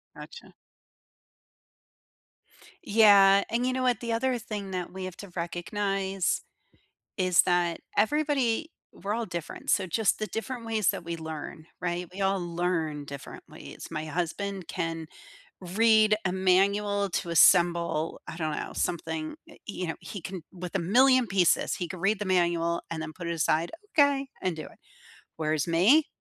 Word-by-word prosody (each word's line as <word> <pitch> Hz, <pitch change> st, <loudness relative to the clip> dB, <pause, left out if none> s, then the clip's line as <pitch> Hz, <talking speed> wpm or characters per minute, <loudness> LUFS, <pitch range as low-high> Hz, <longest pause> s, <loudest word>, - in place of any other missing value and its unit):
Gotcha. 475 Hz, -, -12 dB, 2.3 s
Yeah, 200 Hz, -2 st, +6 dB
and 235 Hz, +2 st, 0 dB
you 255 Hz, -, +1 dB
know 260 Hz, 0 st, -1 dB
what? 250 Hz, -3 st, +2 dB
The 235 Hz, -1 st, -3 dB
other 250 Hz, +2 st, 0 dB
thing 205 Hz, -3 st, -6 dB
that 180 Hz, -2 st, -4 dB
we 190 Hz, 0 st, -6 dB
have 185 Hz, -2 st, -7 dB
to 200 Hz, -3 st, -10 dB
recognize, 190 Hz, +2 st, -1 dB, 0.8 s
is 185 Hz, -2 st, +4 dB
that 175 Hz, -1 st, +1 dB, 0.2 s
everybody 290 Hz, +3 st, +1 dB, 0.2 s
we're 200 Hz, +3 st, -4 dB
all 230 Hz, +1 st, -2 dB
different. 175 Hz, -4 st, -6 dB
So 195 Hz, -, +3 dB
just 200 Hz, +4 st, +1 dB
the 215 Hz, -, -2 dB
different 230 Hz, +2 st, -5 dB
ways 220 Hz, -4 st, +1 dB
that -, -, -2 dB
we 170 Hz, 0 st, -4 dB
learn. 160 Hz, 0 st, -7 dB, 0.2 s
Right? 175 Hz, 0 st, -2 dB
We 195 Hz, -, -6 dB
all 195 Hz, 0 st, +2 dB
learn 170 Hz, -4 st, -2 dB
differently, 140 Hz, -1 st, -10 dB
it's -, -, -10 dB
My 155 Hz, -1 st, -4 dB
husband 180 Hz, +4 st, -3 dB
can 165 Hz, -2 st, -3 dB, 0.5 s
read 215 Hz, +3 st, +4 dB
a 180 Hz, -, +1 dB
manual 200 Hz, +2 st, +2 dB
to 175 Hz, -, -2 dB
assemble, 170 Hz, -1 st, +4 dB
I 160 Hz, -, -7 dB
don't 155 Hz, -2 st, -2 dB
know, -, -, -5 dB
something, 160 Hz, -, -3 dB, 0.2 s
uh, -, -, -14 dB
you 185 Hz, -4 st, -4 dB
know, 160 Hz, -, -3 dB
he 200 Hz, -, -8 dB
can 185 Hz, +1 st, -6 dB
with 180 Hz, -1 st, -7 dB
a -, -, +2 dB
million 255 Hz, +7 st, +4 dB
pieces, 190 Hz, -3 st, +2 dB
he 175 Hz, -, -4 dB
can 185 Hz, -, -7 dB
read 195 Hz, +3 st, +1 dB
the 210 Hz, -, -3 dB
manual 170 Hz, -2 st, +1 dB
and 165 Hz, -1 st, -4 dB
then 160 Hz, 0 st, -5 dB
put 175 Hz, 0 st, -7 dB
it 170 Hz, -, -1 dB
aside, 160 Hz, +1 st, +1 dB, 0.3 s
"Okay," 280 Hz, -1 st, +4 dB
and 185 Hz, -3 st, -1 dB
do 155 Hz, -, -6 dB
it. -, -, -15 dB, 0.6 s
Whereas 155 Hz, 0 st, -1 dB
me, 220 Hz, -, +5 dB
185 Hz, 165 wpm, -28 LUFS, 170-215 Hz, 2.3 s, Yeah